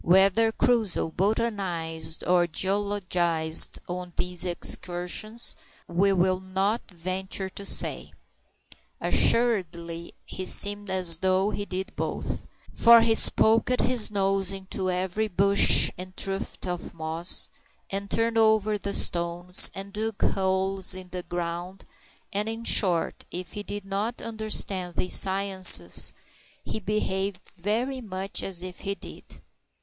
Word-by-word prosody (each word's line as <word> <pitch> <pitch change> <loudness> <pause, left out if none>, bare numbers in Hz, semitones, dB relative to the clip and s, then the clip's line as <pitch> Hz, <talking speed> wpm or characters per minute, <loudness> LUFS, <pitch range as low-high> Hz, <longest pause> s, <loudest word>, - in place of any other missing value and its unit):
Whether 195 +5 +3
Crusoe 220 -8 -1
botanized 180 -6 -2
or 175 -1 +1
geologized 180 -3 0
on 180 0 -7
these 180 -1 -1
excursions 180 +5 -3 0.3
we 190 +4 +1
will 185 0 +1
not 190 +4 -3
venture 190 +2 -4
to 200 - -5
say. - - +1 0.9
Assuredly 170 -8 -1
he 185 -1 -7
seemed 205 0 +2
as 180 -3 +2
though 190 +2 0
he 205 - -5
did 190 -1 -6
both, - - -5 0.3
for 235 0 +6
he 225 0 +2 0.2
poked 225 +3 +2
his 250 -4 +2
nose 195 -2 +1
into 190 -1 -5
every 185 +4 -2
bush 200 +1 +4
and 185 0 -10
tuft 195 0 -3
of 180 -1 -6
moss, 160 +2 +2 0.4
and 200 +1 -5
turned 225 0 +1
over 215 -1 +1
the 200 0 -4
stones, 175 +1 +5
and 195 +1 -9
dug 220 0 -4
holes 190 0 +1
in 185 -1 -10
the 180 0 -6
ground 175 +2 -6 0.5
and, 205 +2 -2
in 225 +1 -7
short, 180 -7 +1
if 180 0 -7
he 205 - -7
did 205 -1 -8
not 205 +5 -4
understand 210 -5 -2
these 180 - 0
sciences, 190 - +6 0.5
he - - -6
behaved 195 -2 -3
very 230 +8 -4
much 195 -3 -4
as 180 -2 -3
if 185 -1 -9
he 200 -1 -4
did. - - -11
190 Hz, 125 wpm, -25 LUFS, 180-205 Hz, 0.9 s, for